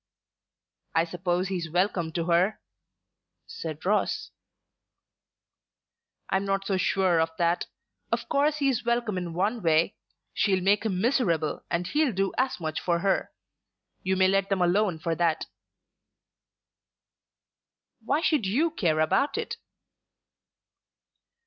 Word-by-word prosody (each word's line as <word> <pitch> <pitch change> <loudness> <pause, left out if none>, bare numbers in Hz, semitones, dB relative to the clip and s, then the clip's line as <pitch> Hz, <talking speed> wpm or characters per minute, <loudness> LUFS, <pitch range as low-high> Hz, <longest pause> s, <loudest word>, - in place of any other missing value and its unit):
"I 165 - +4
suppose 180 +2 -1
he's 175 -4 -3
welcome 175 -1 0
to 170 - -1
her?" 180 +5 +2 0.9
said 160 -1 -7
Ross. 210 - 0 2.0
"I'm 190 +1 +2
not 195 0 -1
so 195 - 0
sure 185 -2 +2
of 160 - +1
that. 170 0 +1 0.4
Of - - -1
course 295 +2 +2
he 280 -2 +1
is 260 -4 0
welcome 235 -3 0
in 175 -2 -4
one 210 +6 0
way. 165 -1 +3 0.4
She'll 190 -3 +2
make 205 +3 +3
him 185 -4 -1
miserable 175 - +1
and 170 +1 -1
he'll 295 - +1
do 195 +1 0
as 260 -4 0
much 155 -2 -3
for 170 -1 +1
her. 195 0 0 0.7
You 190 0 0
may 190 0 +4
let 195 +1 +1
them 195 -2 +2
alone 180 0 +2
for 165 +1 -2
that." 165 -1 0 2.6
"Why 285 +7 +1
should 300 -12 +1
you 295 - +1
care 165 - 0
about 275 - +1
it?" - - -3
190 Hz, 130 wpm, -27 LUFS, 170-215 Hz, 2.6 s, I